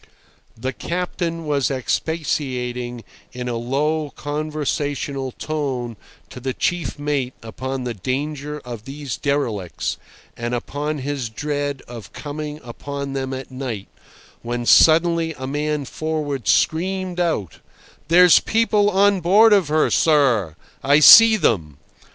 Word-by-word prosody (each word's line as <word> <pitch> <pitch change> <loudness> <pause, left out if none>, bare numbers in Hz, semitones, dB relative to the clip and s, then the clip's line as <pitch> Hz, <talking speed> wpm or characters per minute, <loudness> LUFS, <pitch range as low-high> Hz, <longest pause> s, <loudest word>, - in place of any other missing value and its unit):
The 130 +3 -3
captain 170 +1 -3
was 145 -3 0
expatiating 125 -4 -2 0.3
in 125 0 -5
a 120 - -2
low 145 +6 -1
conversational 145 -2 -3
tone 135 -6 -3 0.4
to - - -8
the 130 0 -4
chief 175 -3 -2
mate 145 -3 -2
upon 130 +3 -5
the 120 -1 -3
danger 145 +7 -4
of 120 -3 -8
these 140 -2 -5
derelicts, 120 - -2 0.4
and 120 +1 -3
upon 145 +5 -3
his 140 -5 -3
dread 145 +2 -3
of 120 -3 -10
coming 150 0 -6
upon 140 +3 -6
them 135 -1 -3
at 130 0 -6
night, 125 -6 -5 0.5
when 120 0 -4
suddenly 165 +2 +4
a 130 - -6
man 150 +1 -2
forward 145 -5 -3
screamed 180 - +1
out, 160 - -1 0.5
"There's 175 +1 +7
people 215 -2 +2
on 200 0 +3
board 210 +6 +6
of 195 -6 +3
her, 155 +1 +2
sir! 125 - +3 0.3
I 145 +2 +5
see 225 +8 +9
them!" 85 - 0
145 Hz, 125 wpm, -21 LUFS, 125-155 Hz, 0.5 s, see